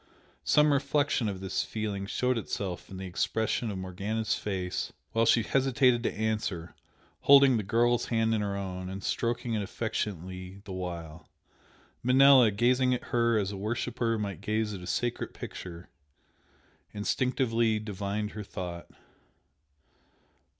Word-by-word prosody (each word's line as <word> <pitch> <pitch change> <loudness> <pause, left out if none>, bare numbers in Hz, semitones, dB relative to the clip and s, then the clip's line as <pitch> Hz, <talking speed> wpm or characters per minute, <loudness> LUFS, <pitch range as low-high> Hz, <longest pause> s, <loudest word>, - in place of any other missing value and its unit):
Some 150 0 +4
reflection 140 -4 +1
of 95 -2 -5
this 95 - -1
feeling 105 -3 -4
showed 125 +4 +1
itself 100 -5 -4
in 95 - -8
the 95 - -6
expression 110 +5 -1
of 100 - -4
Morgana's 100 +4 -2
face 95 -3 -3 0.2
while 115 0 +2
she 115 0 +5
hesitated 130 -1 +3
to - - 0
answer, 105 -6 -2 0.5
holding 140 -2 +7
the - - 0
girl's 120 +4 +2
hand 115 -1 +1
in 110 - +1
her 100 -1 -2
own 95 -1 -5
and 95 +1 -6
stroking 120 0 -1
it 110 - 0
affectionately 95 -2 -4
the 95 - -6
while. 85 -3 -6 0.7
Manella, 130 -1 +7
gazing 125 +4 +2
at - - -6
her 115 -1 +3
as 100 -2 0
a 100 - -6
worshipper 115 +2 -1
might 100 -6 -4
gaze 110 0 -1
at 95 - -6
a 90 - -8
sacred 120 -1 -2
picture, 85 -1 -8 1.1
instinctively 115 0 +1
divined 105 0 -3
her 105 - -6
thought. 90 -3 -6
105 Hz, 140 wpm, -29 LUFS, 95-120 Hz, 1.1 s, holding